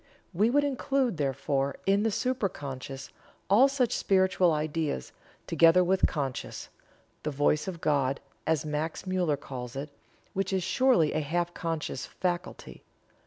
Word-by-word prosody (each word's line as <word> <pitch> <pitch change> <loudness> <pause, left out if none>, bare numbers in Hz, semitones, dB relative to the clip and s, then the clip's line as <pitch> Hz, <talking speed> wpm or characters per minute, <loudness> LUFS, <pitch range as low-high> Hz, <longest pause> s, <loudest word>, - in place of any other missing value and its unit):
We 205 +6 +3
would 290 +4 +3
include, 270 - 0
therefore, 140 -1 -1
in 195 +1 +3
the 225 - +2
supra 250 -1 0
conscious, 135 -2 -7 0.4
all 240 +7 +7
such 270 -4 +1
spiritual 185 -2 +3
ideas, 155 - -2 0.3
together 170 +2 +5
with 185 +1 +3
conscience 135 -5 -4 0.5
the 150 - -2
voice 145 +2 +1
of 175 -3 -5
God, 140 -3 +1 0.3
as 160 -2 +1
Max 155 +4 -3
Muller 180 -6 +1
calls 125 -3 -7
it 140 +2 -5 0.4
which 195 0 -1
is 190 -1 +1
surely 215 - +3
a - - +1
half 175 +4 -1
conscious 165 -6 -3
faculty. 180 -1 -4
165 Hz, 140 wpm, -28 LUFS, 145-195 Hz, 0.5 s, all